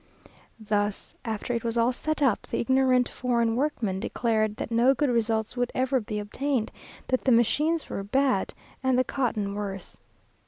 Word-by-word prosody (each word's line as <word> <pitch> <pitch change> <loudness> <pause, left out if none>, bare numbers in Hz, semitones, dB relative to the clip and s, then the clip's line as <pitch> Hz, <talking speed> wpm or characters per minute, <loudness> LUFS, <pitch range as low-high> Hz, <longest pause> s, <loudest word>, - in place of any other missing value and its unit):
There, 210 -1 +1 0.3
after 225 +1 -3
it 235 - -2
was 230 0 -2
all 235 +2 +3
set 310 +3 -2
up, 245 -7 +1
the - - -2
ignorant 255 0 +3
foreign 235 -2 0
workmen 240 -8 -1
declared 215 0 0
that 225 - -5
no 240 +4 +4
good 280 0 +1
results 225 -1 0
would 245 -1 -1
ever 260 +1 +2
be 210 -2 -5
obtained; 230 +3 -2 0.4
that 255 - 0
the 260 - +4
machines 300 +8 +2
were - - -4
bad, 260 0 +1 0.3
and 260 -1 +2
the 255 - +4
cotton 220 -7 -1
worse. 200 -2 -5
235 Hz, 165 wpm, -27 LUFS, 215-260 Hz, 0.4 s, no